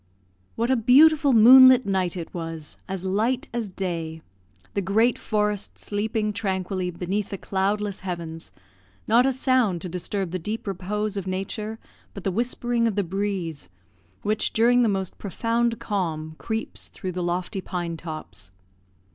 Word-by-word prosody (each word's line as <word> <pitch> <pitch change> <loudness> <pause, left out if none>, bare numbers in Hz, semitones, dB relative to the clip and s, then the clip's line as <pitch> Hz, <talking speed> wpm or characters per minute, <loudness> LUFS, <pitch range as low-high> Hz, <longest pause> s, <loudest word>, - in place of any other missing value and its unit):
What 235 +3 0
a - - +5
beautiful 285 +5 +6
moonlight 255 +2 +8
night 185 -2 0
it 170 - -7
was, 165 -3 -6
as 190 -1 -4
light 230 +9 0
as 235 -3 -2
day! 165 -4 -4 0.5
the 200 - 0
great 220 +6 +2
forest 210 -2 -1
sleeping 215 +1 -2
tranquilly 190 -3 -2
beneath 185 +4 -3
the 195 - -4
cloudless 200 +1 -1
heavens 170 -3 -6 0.6
not 240 +4 +5
a - - +3
sound 255 -8 +1
to 180 - -4
disturb 180 +1 -3
the 185 - -2
deep 210 +6 -4
repose 205 +2 -3
of 195 -1 -4
nature 210 +4 -4 0.4
but 200 - -7
the 195 - 0
whispering 240 +2 0
of 215 - -1
the 205 - +1
breeze, 185 -4 -3 0.5
which, 215 +1 0
during 245 +2 +4
the 235 - +3
most 190 -2 -3
profound 230 +4 -1
calm, 160 -6 -3
creeps 220 0 -4
through 185 -3 -6
the 180 0 -4
lofty 175 +2 -2
pine 175 -3 -4
tops. 155 - -8
200 Hz, 150 wpm, -25 LUFS, 180-225 Hz, 0.6 s, moonlight